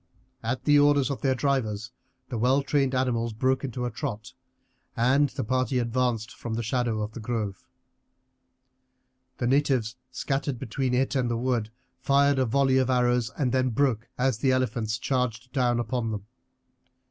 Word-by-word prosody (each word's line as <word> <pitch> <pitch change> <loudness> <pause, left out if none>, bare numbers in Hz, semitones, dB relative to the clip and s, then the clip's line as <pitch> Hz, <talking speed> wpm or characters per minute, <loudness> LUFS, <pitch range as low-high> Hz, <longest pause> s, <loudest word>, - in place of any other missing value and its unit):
At 125 +3 -2
the 145 -1 +5
orders 145 -1 +4
of 130 -5 -4
their 130 -1 +2
drivers 115 -6 -1 0.4
the 120 - -3
well 130 +4 +3
trained 135 -2 +1
animals 120 -3 0
broke 130 +4 +1
into 125 -2 -3
a 120 - -2
trot, 115 -1 -5 0.6
and 135 +5 +3
the - - -4
party 130 +2 0
advanced 120 -1 0
from 115 -2 -5
the 115 - -2
shadow 115 -2 0
of 105 - -5
the 115 - -8
grove. 105 -5 -4 1.7
The 120 - -2
natives 130 -3 +1
scattered 135 +1 -2
between 125 +3 -2
it 130 0 +1
and 125 -3 +1
the 120 - 0
wood 120 -3 0 0.3
fired 140 0 +3
a 130 - +2
volley 135 +2 +3
of 130 -1 +1
arrows 125 -2 +2
and 130 -4 +1
then 130 0 +2
broke 120 -2 0
as 125 -3 +1
the 130 +1 +2
elephants 115 -3 0
charged 125 -2 -2
down 125 -3 +2
upon 120 -1 -1
them. 105 -2 -4
125 Hz, 165 wpm, -27 LUFS, 115-130 Hz, 1.7 s, the